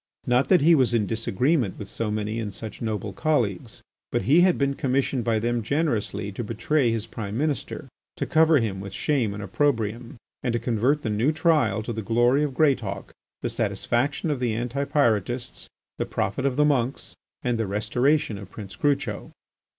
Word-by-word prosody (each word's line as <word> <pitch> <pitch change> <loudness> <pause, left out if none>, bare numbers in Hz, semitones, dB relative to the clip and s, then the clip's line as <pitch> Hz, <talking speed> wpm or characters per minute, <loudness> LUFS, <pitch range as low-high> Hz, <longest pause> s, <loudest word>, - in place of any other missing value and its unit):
Not 125 +2 +2
that 180 - +5
he 165 +4 +6
was 130 -6 +3
in 110 -3 +2
disagreement 115 - 0
with 105 - -7
so 115 +1 -3
many 105 +1 -2
and 105 -3 -3
such 110 +2 -8
noble 105 -3 -3
colleagues, 115 - -1 0.3
but - - 0
he 145 - +5
had 180 -1 +4
been 140 0 +1
commissioned 135 -1 0
by 115 -1 +1
them 120 +2 0
generously 110 -6 -1
to 110 +5 -5
betray 115 +4 +1
his 115 -2 -2
Prime 105 -1 -5
Minister, 150 +1 -2 0.3
to - - -1
cover 160 0 +4
him 105 -6 -1
with 100 0 -7
shame 125 -3 0
and 105 +1 -6
opprobrium, 115 +2 -1 0.2
and 125 -2 -1
to 120 - +1
convert 125 +6 +1
the 110 - -1
new 115 +8 +2
trial 150 - +2
to 120 - -4
the 110 - -4
glory 120 +6 +3
of 140 -3 -2
Greatauk, 115 -11 0 0.3
the - - 0
satisfaction 145 +6 -1
of 140 - -2
the 120 -3 0
Anti 125 +4 -2
Pyrotists, 120 -3 0 0.3
the - - -1
profit 130 +8 -1
of 130 - -1
the 150 +1 +4
monks, 135 -3 -1 0.3
and 120 -3 0
the 110 - 0
restoration 115 +4 +1
of 100 -2 -10
Prince 100 -1 -9
Crucho. 140 -7 -1
120 Hz, 185 wpm, -25 LUFS, 105-140 Hz, 0.3 s, he